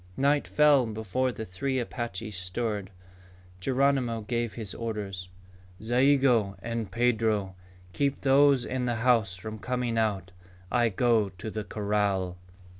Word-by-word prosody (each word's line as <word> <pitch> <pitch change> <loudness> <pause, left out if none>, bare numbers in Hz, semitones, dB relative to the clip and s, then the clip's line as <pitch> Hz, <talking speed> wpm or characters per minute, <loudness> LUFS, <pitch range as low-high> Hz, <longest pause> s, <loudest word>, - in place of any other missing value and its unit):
Night 140 +1 +2
fell 145 -5 +4
before 110 +4 -1
the 110 -2 -6
three 130 +9 -2
Apaches 115 -4 -4
stirred. 100 +2 -2 0.7
Geronimo 130 0 +1
gave 115 +1 -2
his 110 -5 -5
orders. 100 -5 -5 0.5
"Zayigo 120 -4 +3
and 115 -1 -4
Pedro, 110 -5 +1 0.4
keep 140 -1 0
those 140 -1 +4
in 130 -1 -2
the 120 -1 0
house 115 -7 +3
from 110 +4 -7
coming 125 -1 -1
out. 100 -4 -1 0.4
I 120 -2 +3
go 110 -1 +2
to 95 +4 -8
the 110 0 -4
corral." 100 -3 -1
115 Hz, 125 wpm, -28 LUFS, 100-125 Hz, 0.7 s, fell